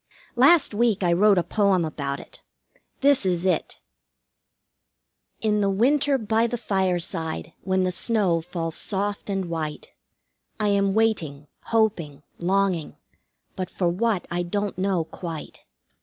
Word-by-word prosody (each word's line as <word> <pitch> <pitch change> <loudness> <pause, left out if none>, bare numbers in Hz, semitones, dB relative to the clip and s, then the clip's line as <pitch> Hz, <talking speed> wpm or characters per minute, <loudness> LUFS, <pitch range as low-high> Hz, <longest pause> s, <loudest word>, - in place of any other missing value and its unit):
Last 275 +2 +5
week 215 -2 +1
I 175 -1 +3
wrote 200 +3 +4
a 175 - +3
poem 195 -4 +2
about 140 -3 -4
it. - - -13 0.6
This 280 -2 +4
is 180 -1 0
it: 180 -4 -1 1.6
"In 210 -1 +1
the 200 - +2
winter, 275 +7 +2
by 225 0 +1
the 240 +1 -3
fireside, 180 -6 -2
when 190 0 0
the 185 - 0
snow 190 -4 +1
falls 165 -1 -4
soft 205 +1 -2
and 195 -1 -1
white, 160 -3 -5 0.7
I 210 -1 +1
am 200 -1 +2
waiting, 165 -11 0 0.2
hoping, 180 -11 0 0.2
longing, 185 -2 0 0.6
but 185 -1 -4
for 175 -2 0
what 200 +2 0
I 175 +1 0
don't 200 +3 -2
know 185 -2 0
quite. 165 -1 -8
190 Hz, 135 wpm, -24 LUFS, 170-215 Hz, 1.6 s, Last